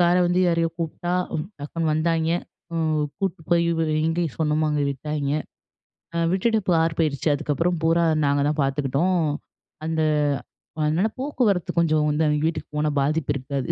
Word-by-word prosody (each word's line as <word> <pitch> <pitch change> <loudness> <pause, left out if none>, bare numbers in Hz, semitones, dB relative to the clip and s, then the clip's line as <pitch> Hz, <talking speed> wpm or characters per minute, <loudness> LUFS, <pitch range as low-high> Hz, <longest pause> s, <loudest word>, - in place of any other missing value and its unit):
கார 175 0 +4
வந்து 175 +1 +2
யாரையோ 165 -1 +1
கூப்புட்டா, 175 +2 -2 0.5
டக்குனு 155 +2 -2
வந்தாய்ங்க, 160 +1 +1 0.4
அ - - -2 0.4
கூட்டு 190 -4 -2
போய் 170 -1 +4 0.4
எங்க 165 +2 +1
சொன்னோமோ 155 0 +1
அங்க 150 -1 +1
விட்டாய்ங்க. 145 +1 -2 0.8
அ - - 0 0.2
விட்டுட்டு 220 +3 +2
பார் 165 -1 +2
போயிறுச்சு, 155 -1 +1
அதுக்கப்புறம் 165 +5 0
பூரா, 165 +1 +3 0.2
நாங்க 140 0 +2
தான் 150 -1 0
பார்த்துக்குட்டோம். 140 +6 +1 0.7
அந்த 160 0 0 0.8
அதனால 160 +7 +2
போக்குவரத்து 245 - 0
கொஞ்சம் 155 -2 +2
வந்து 150 +2 +1
அவிங்க 150 +1 +1
வீட்டுக்கு 160 -2 -4
போனா 150 0 +1
பாதிப்பு 150 +1 0
இருக்காது 135 -1 -3
160 Hz, 140 wpm, -24 LUFS, 150-170 Hz, 0.8 s, கார